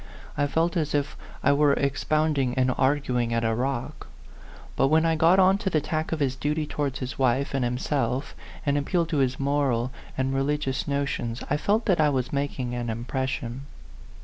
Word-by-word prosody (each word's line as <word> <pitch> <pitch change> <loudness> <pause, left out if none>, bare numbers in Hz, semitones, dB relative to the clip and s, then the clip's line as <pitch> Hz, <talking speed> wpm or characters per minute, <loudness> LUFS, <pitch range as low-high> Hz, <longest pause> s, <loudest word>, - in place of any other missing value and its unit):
I 145 0 +1
felt 165 +4 0
as 155 -2 0
it' 145 -1 +2 0.4
I - - +5
were 145 0 +4
expounding 140 -1 0
and 130 -1 +2
arguing 125 -4 +1
at 115 - 0
a 115 0 +1
rock. 125 +1 -3 0.7
But 135 - +3
when 160 +3 +3
I 165 0 +2
got 165 +4 +5
on 190 +1 +5
to 210 -3 -1
the 160 - +2
tack 155 +1 -3
of 165 - -1
his 135 -2 +1
duty 150 +3 -1
towards 145 -3 -2
his 130 +1 -6
wife 130 +2 +1
and 135 -2 0
himself, 125 +1 -1 0.3
and 145 0 +2
appealed 165 +3 0
to 160 - 0
his 130 -1 +1
moral 135 -3 +1 0.3
and 130 0 0
re 135 - +1
ligious 140 -1 -1
notions, 140 -4 -2
I 145 - +3
felt 210 +8 +1
that 180 -5 +3
I 150 - +4
was 130 -2 -1
making 140 -3 -2
an 120 -1 -3
impression. 130 +2 -3
140 Hz, 190 wpm, -26 LUFS, 130-150 Hz, 0.7 s, I